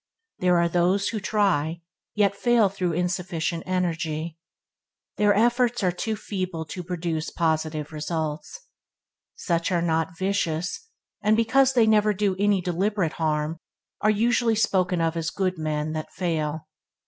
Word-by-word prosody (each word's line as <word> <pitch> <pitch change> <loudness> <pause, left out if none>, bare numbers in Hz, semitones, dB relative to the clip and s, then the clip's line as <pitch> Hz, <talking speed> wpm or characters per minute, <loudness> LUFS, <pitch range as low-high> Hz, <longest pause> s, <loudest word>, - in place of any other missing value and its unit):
There 180 -1 +3
are 170 0 +3
those 180 +4 +2
who 220 - -3
try, 170 -6 0 0.3
yet 200 -2 +2
fail 235 -2 +3
through 185 -3 -2
insufficient 175 -1 -2
energy. 165 -3 -2 0.8
Their 205 -1 +4
efforts 240 +1 +2
are 180 - +3
too 220 +5 -3
feeble 185 -5 -4
to 180 - -5
produce 170 -2 -3
positive 155 -2 -1
results. 155 - -4 0.7
Such 170 +1 -1
are 170 -2 +1
not 165 +1 0
vicious, 190 - -1 0.3
and 215 +1 +3
because 260 +4 +3
they 240 -3 +5
never 215 -1 +3
do 200 -1 +1
any 205 -2 +3
deliberate 180 0 0
harm, 155 +1 0 0.4
are 215 - +3
usually 225 +2 +2
spoken 185 -4 +1
of 165 0 0
as 165 -1 -1
good 185 -1 -2
men 155 0 -2
that 155 0 -5
fail. 155 -3 -2
180 Hz, 140 wpm, -25 LUFS, 160-205 Hz, 0.8 s, they